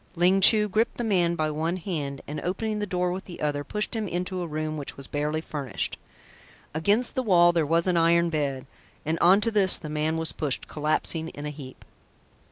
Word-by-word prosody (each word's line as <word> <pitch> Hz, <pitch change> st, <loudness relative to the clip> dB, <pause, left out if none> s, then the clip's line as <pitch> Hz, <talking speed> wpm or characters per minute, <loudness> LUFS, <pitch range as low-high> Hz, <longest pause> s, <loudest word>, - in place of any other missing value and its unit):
Ling 180 Hz, +3 st, +3 dB
Chu 210 Hz, +2 st, +6 dB
gripped 215 Hz, +3 st, 0 dB
the 240 Hz, -, -2 dB
man 180 Hz, -6 st, +2 dB
by 155 Hz, -2 st, -1 dB
one 160 Hz, +4 st, -2 dB
hand 150 Hz, -7 st, -4 dB
and 150 Hz, -, -5 dB
opening 210 Hz, +4 st, -2 dB
the 205 Hz, -, -2 dB
door 180 Hz, -1 st, -1 dB
with 185 Hz, +2 st, -5 dB
the 175 Hz, -, -10 dB
other, 145 Hz, -1 st, -1 dB
pushed 210 Hz, -, -2 dB
him 220 Hz, -2 st, -2 dB
into 180 Hz, +1 st, -3 dB
a 175 Hz, -, -3 dB
room 155 Hz, 0 st, -3 dB
which 145 Hz, -2 st, -6 dB
was 140 Hz, -, -4 dB
barely 150 Hz, +3 st, -2 dB
furnished. 140 Hz, -9 st, -4 dB, 0.8 s
Against 205 Hz, +10 st, +1 dB
the 260 Hz, -, 0 dB
wall 175 Hz, -7 st, +5 dB
there 165 Hz, -3 st, +1 dB
was 165 Hz, +2 st, +2 dB
an 180 Hz, -2 st, +2 dB
iron 170 Hz, 0 st, +3 dB
bed, 140 Hz, -4 st, -2 dB, 0.4 s
and 160 Hz, +2 st, -1 dB
on 190 Hz, +4 st, +5 dB
to 230 Hz, -, +1 dB
this 200 Hz, -3 st, +5 dB
the 155 Hz, -, -8 dB
man 155 Hz, +1 st, -1 dB
was 160 Hz, 0 st, -2 dB
pushed, 145 Hz, -4 st, -2 dB
collapsing 155 Hz, +2 st, -1 dB
in 145 Hz, -2 st, -8 dB
a 150 Hz, -, -3 dB
heap. 135 Hz, -3 st, -11 dB
170 Hz, 210 wpm, -26 LUFS, 150-185 Hz, 0.8 s, Chu